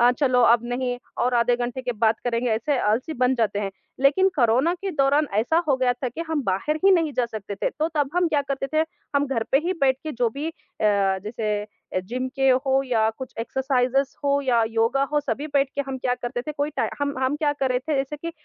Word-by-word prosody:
अ, 240 +1 +6
"चलो, 255 -2 +2
अब 235 0 +5
नहीं, 245 -1 -2 0.2
और 250 0 +1
आधे 240 +1 +3
घंटे 245 +1 -3
के 245 -1 -2
बाद 220 0 +2
करेंगे।' 240 0 0
ऐसे 250 +5 0
आलसी 235 +10 0
बन 255 +1 +3
जाते 210 -4 0
हैं। 195 -1 -2 0.3
लेकिन 295 +8 +4
कोरोना 255 +8 +3
के 385 +2 -4
दौरान 285 0 +2
ऐसा 320 +11 +2
हो 270 - +4
गया 255 -1 +2
था 250 +1 -4
कि 285 +8 -8
हम 310 -3 0
बाहर 195 +12 0
ही 390 - +7
नहीं 330 -5 +3
जा 250 -2 0
सकते 205 -3 -6
थे, - - -1
तो 310 +2 -1
तब 290 -2 +1
हम 355 -1 +3
क्या 290 -2 +1
करते 275 0 -3
थे, 310 +1 +3 0.3
हम 285 0 +2
घर 250 -4 -1
पे 270 - +6
ही 365 - +1
बैठ 265 -1 +3
के 310 -1 -4
जो 240 -1 +1
भी 290 +6 -4
अ, - - -6 0.7
जैसे 210 -1 -2 0.3
अ, - - +2
जिम 250 +7 -4
के 270 0 +3
हो 265 +1 +2
या 220 -3 +2 0.3
एक्सरसाइज़ेज़ 260 +1 0
कुछ - - -30
हों 280 0 +2
या 240 -4 +3
योगा 230 +4 +1
हो, 295 - +3
सभी 290 +1 -3
बैठ 275 -1 +3
के 280 - -1
हम 265 -1 -3
क्या 250 -1 0
करते 245 0 -4
थे, 305 - -5
कोई 290 +1 -2
टाइ - - +1
हम 285 0 0
हम 260 +2 +1
क्या 295 -1 +1
कर 270 -2 -1
रहे 250 - +2
थे, 295 +4 -3
जैसे 270 +2 -2
कि 335 +3 -5
260 Hz, 245 wpm, -24 LUFS, 240-290 Hz, 0.7 s, ही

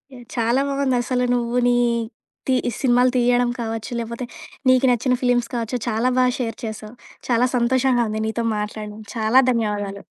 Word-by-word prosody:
ఎ - - -11 0.2
చాలా 235 +3 +2
బాగుందసలు. 255 -2 0
నువ్వు 240 0 -1
నీ, 245 - +4 0.7
తి 260 - +3 0.3
సినిమాలు 250 -1 +4
తీయడం 245 0 +3
కావచ్చు. 225 -1 -4
లేకపోతే, 235 +2 -5 0.4
నీకు 255 +1 +4
నచ్చిన 250 +2 +1
ఫిల్మ్స్ 245 -1 +2
కావచ్చు. 235 +1 -2
చాలా 230 +3 +1
బాగా 255 0 +4
షేర్ 230 -3 -3
చేసావు. 215 +1 -7 0.3
చాలా 245 +1 +3
సంతోషంగా 250 0 +2
ఉంది 215 0 -3
నీతో 230 +1 -2
మాట్లాడడం. 210 0 -5 0.2
చాలా 225 +3 +4
ధన్యవాదాలు. 205 -4 -2
240 Hz, 145 wpm, -21 LUFS, 225-250 Hz, 0.7 s, నీ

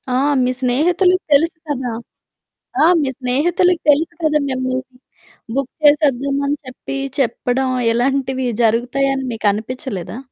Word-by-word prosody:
ఆ! - - +3 0.3
మీ 250 - +1
స్నేహితులకి 355 +9 +2
తెలుసు 320 +3 +3
కదా! 255 -4 -2 0.9
ఆ! - - +6 0.2
మీ 285 - 0
స్నేహితులకి 335 +8 +1
తెలుసు 320 +4 +1
కదా 305 -1 +2
మిమ్మల్ని 255 0 -3 0.6
బుక్ 275 -2 -2
చేసేద్దాం 280 -2 +3
అని 290 +1 0
చెప్పి 255 +1 -7 0.2
చెప్పడం 255 +1 0 0.2
ఇలాంటివి 260 +2 0 0.2
జరుగుతాయని 265 +4 +1
మీకనిపిచలేదా? 220 - -3
265 Hz, 110 wpm, -18 LUFS, 250-290 Hz, 0.9 s, ఆ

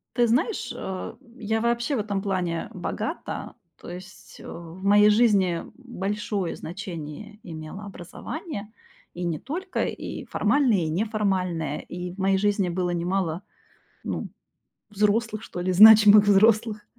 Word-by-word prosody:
Ты 240 -1 +3
знаешь, 250 - 0
а 190 -1 -6 0.2
я 220 0 -1
вообще 235 +4 0
в - - -1
этом 205 -2 -2
плане 180 -4 -2
богата. - - -5 0.3
То - - -10
есть, 185 +2 -11
э, - - -11
в 170 +2 -10
моей 205 +1 +6
жизни 205 -6 +3
большое 210 -6 -3
значение 175 +2 -8
имело 160 +4 -8
образование, 205 - -7 0.4
и 175 - -6
не 170 -3 -2
только, 365 +8 -3
и - - -6
формальное, 260 -9 +2
и 160 -2 -1
неформальное. 185 -5 -1
И 180 0 -7
в 185 - -13
моей 195 0 +2
жизни 200 -2 +1
было 180 +1 -1
немало, 175 0 -1 0.6
ну, - - -4 0.6
взрослых, 215 +2 0
что 175 - -7
ли, 185 +1 0
значимых 210 +1 +9
взрослых, 215 +1 +3
200 Hz, 135 wpm, -25 LUFS, 180-215 Hz, 0.6 s, значимых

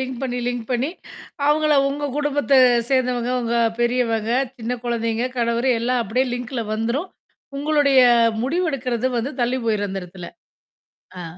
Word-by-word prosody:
Link 260 -1 -4
பண்ணீ 245 -1 -2
link 245 -2 -4
பண்ணீ, 255 +5 0 0.6
அவுங்கள 300 0 +3
உங்க 290 +1 -3
குடும்பத்தை 290 -2 +2 0.3
சேர்ந்தவங்க, 250 -2 +1
உங்க 235 0 -1 0.2
பெரியவங்க, 235 -2 0 0.3
சின்ன 240 +2 -3
குழந்தைங்க, 230 0 -1
கணவரு 235 +2 +1
எல்லாம் 245 0 0
அப்படியே 250 +6 0
லிங்க்ல 245 -1 -4
வந்துரும். 235 +11 -2 0.5
உங்களுடைய 290 -2 +3 0.4
முடிவெடுக்கிறது 260 -5 -1
வந்து, 245 +5 -2
தள்ளி 245 +2 +1
போயிரும் 205 -2 0
அந்த 195 -1 -4
எடத்துல! 180 -1 -10 0.9
ஆ. - - -5
245 Hz, 130 wpm, -21 LUFS, 230-275 Hz, 0.9 s, அவுங்கள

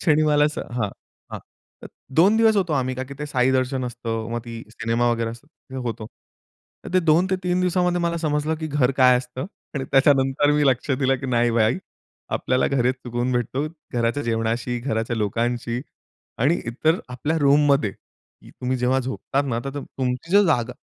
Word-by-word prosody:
क्षणी 155 -2 +3
मला 150 -1 +4
असं 150 - -1
हां. 110 -4 -1 0.4
हां. - - -4 0.4
तर - - -7 0.3
2 195 +6 +6
दिवस 225 -1 +4
होतो 180 -5 +1
आम्ही 130 -2 0
का 130 - -4
की 140 +1 -10
ते 150 - -4
साई 130 -3 +2
दर्शन 130 0 0
असतं, 115 -2 -4
मग 120 - -1
ती 115 -1 -7
सिनेमा 115 +1 0
वगैरे 115 -1 -1
असतं 130 +2 -13
होतं. 110 -2 -4 0.8
तर - - -8
ते 185 - +5
2-3 180 +2 +2
दिवसामध्ये 180 -1 +1
मला 170 0 0
समजलं 155 0 0
की 160 - -2
घर 140 -3 +1
काय 125 -1 +6
असतं 125 +2 -6 0.3
आणि 135 -2 -2
त्याच्यानंतर 135 +1 +3
मी 150 0 +2
लक्ष 130 +2 +1
दिलं 135 0 +2
की 135 - -4
नाही 120 -1 +2
भाई, 115 +6 +2 0.6
आपल्याला 130 0 +1
घरीच 130 -2 +1
सुकून 125 0 -3
भेटतो, 125 +4 -1 0.3
घराच्या 120 +4 0
जेवणाशी, 115 +1 -1
घराच्या 115 -2 -2
लोकांशी 115 +3 -1 0.6
आणि 145 +8 +2
इतर 155 +9 +1
आपल्या 135 +6 -2
रूममध्ये 140 -5 +3 0.5
तुम्ही 130 +1 -3
जेव्हा 125 +2 +2
झोपतात 130 +2 -2
ना, 115 -3 -1
तर 135 +1 -4
तुमची 130 +4 -4
जर 205 - +7
जागा. 125 -7 +1
130 Hz, 175 wpm, -23 LUFS, 120-150 Hz, 0.8 s, जर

